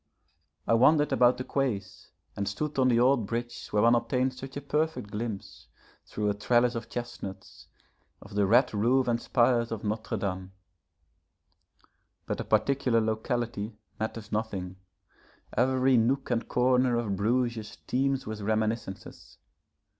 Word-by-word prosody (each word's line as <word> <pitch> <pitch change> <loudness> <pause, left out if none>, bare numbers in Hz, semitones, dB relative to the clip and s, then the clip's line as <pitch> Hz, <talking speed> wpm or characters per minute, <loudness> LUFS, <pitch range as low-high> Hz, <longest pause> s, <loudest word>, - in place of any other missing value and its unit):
I - - +3
wandered 145 +5 +4
about 125 0 +4
the 130 - -4
Quais 130 -8 -3 0.3
and 100 0 -3
stood 150 +7 -3
on 130 - +4
the 120 -2 +3
old 125 -3 +3
bridge 120 +2 -4
where 105 0 +1
one 115 +1 +6
obtains 130 +1 0
such 135 +1 -7
a - - -4
perfect 150 -6 -1
glimpse, 105 -2 -6 0.4
through 105 0 -2
a 105 - +2
trellis 120 +4 +2
of 115 -1 -5
chestnuts, 120 -5 -7 0.5
of - - -13
the 100 -1 +2
red 120 +5 +4
roof 125 +5 +2
and 120 -1 +1
spires 120 -1 +2
of 110 -2 -4
Notre 110 +1 -2
Dame. 95 -2 -4 1.7
But - - -3
the - - -2
particular 130 -4 +2
locality 110 -1 -2 0.2
matters 110 0 -4
nothing; 95 -4 -3 0.8
every 130 0 +3
nook 130 +4 +1
and 115 -1 0
corner 125 0 +2
of 110 -4 -1
Bruges 115 +1 -1
teems 135 +1 0
with 110 0 -5
reminiscences. 110 -1 -3
120 Hz, 140 wpm, -28 LUFS, 105-130 Hz, 1.7 s, one